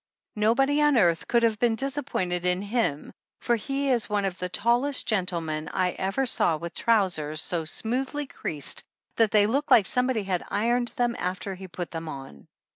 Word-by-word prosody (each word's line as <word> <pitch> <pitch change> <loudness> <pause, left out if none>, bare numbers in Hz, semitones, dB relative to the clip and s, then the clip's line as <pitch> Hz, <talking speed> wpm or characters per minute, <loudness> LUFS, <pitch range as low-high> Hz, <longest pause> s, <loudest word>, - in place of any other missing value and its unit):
Nobody 270 +7 +2
on 295 -3 +4
earth 170 -6 +3
could 235 -1 +2
have 220 -2 +2
been 235 -2 +2
dis 270 +3 -3
appointed 180 -11 -2
in 180 +1 0
him 205 - -1 0.3
for 240 - +1
he 275 +4 -1
is 235 -4 +1
one 205 -1 0
of 190 -1 -3
the 180 - -3
tallest 245 +8 +1
gentlemen 170 -7 -1
I 185 -1 +1
ever 195 +10 -1
saw 170 -9 +2
with 170 +2 -7
trousers 180 -9 +1
so 165 0 -1
smoothly 260 - -2
creased 150 - -4 0.3
that 225 -2 +4
they 205 0 +4
look 275 +7 0
like 215 - +6
somebody 250 -1 0
had 185 -2 -1
ironed 240 +4 +1
them 240 -1 0
after 185 +2 -3
he 190 0 -9
put 175 0 -6
them 165 -1 -5
on. 135 - -9
210 Hz, 185 wpm, -26 LUFS, 180-245 Hz, 0.3 s, like